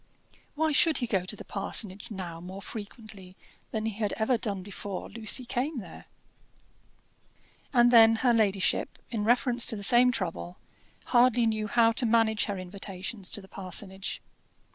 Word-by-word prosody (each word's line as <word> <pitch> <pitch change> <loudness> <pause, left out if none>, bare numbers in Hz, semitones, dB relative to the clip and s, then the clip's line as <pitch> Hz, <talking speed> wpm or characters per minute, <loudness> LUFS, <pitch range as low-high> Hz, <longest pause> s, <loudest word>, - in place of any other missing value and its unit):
Why 315 +1 +1
should 315 +2 +4
he 245 - -1
go 195 -6 -1
to 200 - -3
the - - -11
parsonage 200 0 -2
now 180 -5 -7
more 190 +3 -9
frequently 205 -4 -10 0.3
than 220 -1 -3
he 225 - -1
had 210 -2 -1
ever 225 +3 +1
done 200 -5 -3
before 200 0 -7
Lucy 230 +3 0
came 270 +5 -2
there? 215 - -9 1.7
And 240 -2 +4
then 225 -1 +7
her 240 +1 +2
ladyship, 200 -5 +1
in 220 -3 -2
reference 245 +1 +3
to - - +4
the 200 - -6
same 250 +3 +6
trouble, 180 -4 -4 0.6
hardly 245 -1 +4
knew 215 -1 -1
how 230 +1 +3
to 235 +1 -1
manage 220 -1 +2
her 205 -2 -4
invitations 190 +1 -6
to 205 - -2
the 190 - -15
parsonage. 190 +1 -4
220 Hz, 160 wpm, -28 LUFS, 195-240 Hz, 1.7 s, then